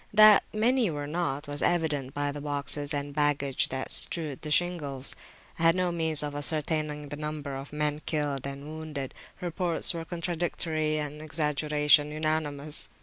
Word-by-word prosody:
That 215 0 +8
many 235 +1 +2
were 145 -2 -4
not, 150 -2 -3
was 145 0 -3
evident 150 -6 0
by 145 0 -1
the 145 0 -7
boxes 145 0 -1
and 145 -1 -3
baggage 145 -2 +1
that 130 0 -3
strewed 155 -6 +4
the 155 - -6
shingles. 150 -5 0 0.5
I - - -5
had 165 0 +5
no 180 -1 0
means 160 -3 +2
of 145 -1 -4
ascertaining 150 0 0
the 145 - -6
number 150 -2 -5
of 135 +1 -8
men 150 0 -1
killed 145 -4 -1
and 140 +1 -7
wounded: 155 -3 -6 0.3
reports 175 0 +1
were 165 -1 -4
contradictory, 165 -2 -1
and 150 0 -4
exaggeration 150 -1 +2
unanimous. 155 -1 -2
150 Hz, 155 wpm, -28 LUFS, 145-160 Hz, 0.5 s, That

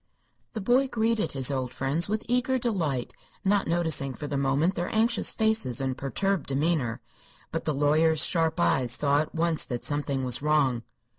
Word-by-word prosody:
The 220 - -5
boy 250 +6 +2
greeted 225 -2 -1
his 135 0 +3
old 130 -2 -4
friends 145 +7 -1
with 215 +1 -2
eager 250 +2 +1
delight, 170 - -2 0.3
not 200 0 +1
noticing 160 -6 0
for 150 - -7
the 145 - -4
moment 140 +6 +1
their 175 -1 -3
anxious 225 +2 +2
faces 220 - +1
and 130 -1 -2
perturbed 195 +7 -2
demeanor. 140 -4 -1 0.5
But - - -4
the 155 - 0
lawyer's 155 +3 +3
sharp 165 -2 +1
eyes 120 +9 +2
saw 140 +4 +2
at 155 +2 -4
once 165 -1 +1
that 120 -3 -5
something 145 -2 -1
was 125 -1 +1
wrong. 145 -5 +1
155 Hz, 170 wpm, -26 LUFS, 135-195 Hz, 0.5 s, his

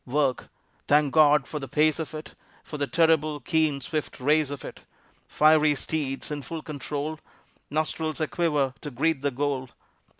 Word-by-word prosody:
Work! 135 -1 0 0.4
Thank 145 -1 +3
God 150 -3 +5
for 150 - -4
the 135 - -6
pace 155 +4 +2
of 160 0 -5
it, 155 - -8 0.3
For 150 - -7
the 145 - 0
terrible, 155 -2 +2
keen, 155 -3 +1
swift 155 +4 -4
race 150 +2 +2
of 145 -2 -6
it; - - -9 0.5
Fiery 155 -1 +4
steeds 145 -1 -3
in 145 -1 -3
full 160 +3 -6
control, 150 +1 -4 0.5
Nostrils 155 +1 -2
a 155 - 0
quiver 150 -7 0
to 150 - -5
greet 145 +3 0
the 140 - +1
goal. 135 -1 -2
150 Hz, 165 wpm, -26 LUFS, 140-155 Hz, 0.5 s, God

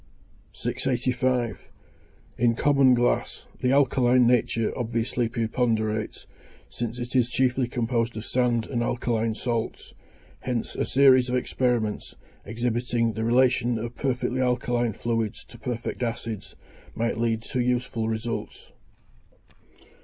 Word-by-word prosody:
685. 125 -2 -1 0.7
In 115 0 +3
common 135 -1 +4
glass, 120 0 0
the 125 0 +1
alkaline 130 -2 +4
nature 115 -2 +2
obviously 115 0 -1
preponderates, 110 -2 -1 0.5
since 120 0 -4
it 120 +1 -5
is 125 -2 +3
chiefly 125 +1 +1
composed 120 -1 -1
of 110 - -5
sand 120 -2 +1
and 120 -3 -2
alkaline 115 -2 0
salts; 115 -1 -3 0.5
hence 125 -3 -3
a - - 0
series 130 -2 +5
of 125 - 0
experiments, 120 -4 -1 0.3
exhibiting 115 +1 -1
the 110 - -3
relation 120 0 +3
of 115 +2 -5
perfectly 130 -1 -1
alkaline 120 -2 0
fluids 115 -1 -2
to 120 - -14
perfect 120 +2 -4
acids, 115 -3 -4 0.4
might 115 -1 -1
lead 115 -1 0
to 125 - -3
useful 120 -2 0
results. 115 +1 -4
120 Hz, 115 wpm, -26 LUFS, 115-125 Hz, 0.7 s, series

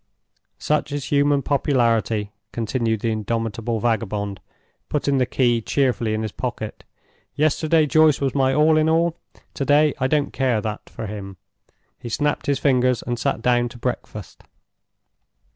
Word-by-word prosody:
"Such 150 +5 -1
is 145 -2 -4
human 145 -1 +3
popularity!" 115 -7 +1 0.2
continued 115 -1 -1
the 115 - 0
indomitable 115 +1 -2
vagabond, 105 -3 -1 0.5
putting 140 -2 0
the 125 - +1
key 120 -3 +1
cheerfully 120 -3 0
in 110 - -2
his 110 - -3
pocket. 120 -3 -5 0.5
"Yesterday 155 +1 +2
Joyce 155 0 +4
was 135 -2 -1
my 135 -2 +2
all 155 +3 +4
in 155 0 +3
all. 165 +1 +2 0.4
To - - -3
day 145 +1 +4
I 130 - +1
don't 145 0 0
care 130 -4 +1
that 105 0 -5
for 115 - -7
him!" 100 -2 -7 0.6
He 120 - -7
snapped 145 +5 -1
his 140 -1 +2
fingers 125 -3 +2
and 120 0 -3
sat 115 - -1
down 120 -1 +2
to 120 - -12
breakfast. 115 -5 -5
125 Hz, 150 wpm, -22 LUFS, 110-145 Hz, 0.6 s, Joyce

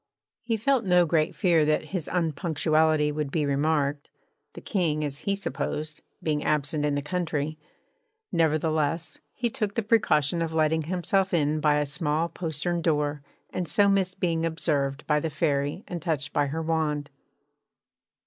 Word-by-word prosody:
He 230 -1 -1
felt 260 +3 +2
no 180 -2 +4
great 155 -1 +1
fear 170 -4 +3
that 155 0 0
his 175 -5 -2
unpunctuality 155 -2 +1
would 150 -1 -2
be 150 +1 0
remarked, 145 0 0 0.4
the - - -8
King 160 -7 0
(as 140 -1 -4
he 200 - +2
supposed) 155 -3 -4 0.2
being 150 -2 0
absent 150 0 0
in 145 -1 +1
the 145 - -2
country; 155 -2 -2 0.7
nevertheless 160 0 0
he 245 - -2
took 215 -4 -3
the 230 - 0
precaution 175 - +2
of 165 -1 -2
letting 160 0 +2
himself 185 +2 0
in 150 -1 +1
by 150 -1 +3
a 150 0 +1
small 150 +3 -1
postern 170 +1 -3
door, 150 -3 0 0.3
and 180 -2 -3
so 200 +7 +3
missed 190 -2 +1
being 165 -3 0
observed 150 -4 -1
by 150 -1 +2
the 160 - -2
Fairy 145 +3 -1
and 175 -2 -5
touched 150 -5 -2
by 145 - +2
her 160 +4 -3
wand. 150 -3 -1
155 Hz, 160 wpm, -26 LUFS, 150-175 Hz, 0.7 s, no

